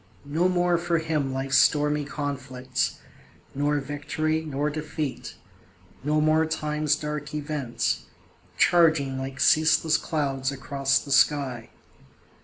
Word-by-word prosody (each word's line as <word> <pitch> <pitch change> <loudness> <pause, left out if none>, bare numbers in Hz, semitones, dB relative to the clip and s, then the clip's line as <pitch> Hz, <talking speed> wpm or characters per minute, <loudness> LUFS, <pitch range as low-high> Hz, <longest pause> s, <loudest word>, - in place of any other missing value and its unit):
No 160 +6 +1
more 175 -1 +2
for 170 -1 0
him 155 -4 -1
life's 135 0 0
stormy 150 -1 +2
conflicts, 135 -3 -3 0.6
Nor 145 +1 0
victory, 150 +3 -2
nor 150 -1 -2
defeat 155 -2 -5 0.7
no 150 +2 +1
more 155 +1 +3
time's 150 -2 0
dark 150 0 -5
events, 145 -5 -2 0.5
Charging 155 -6 +3
like 130 0 -6
ceaseless 160 0 +4
clouds 135 -4 -2
across 135 0 0
the 140 - -5
sky. 135 -4 +2
150 Hz, 110 wpm, -25 LUFS, 135-155 Hz, 0.7 s, ceaseless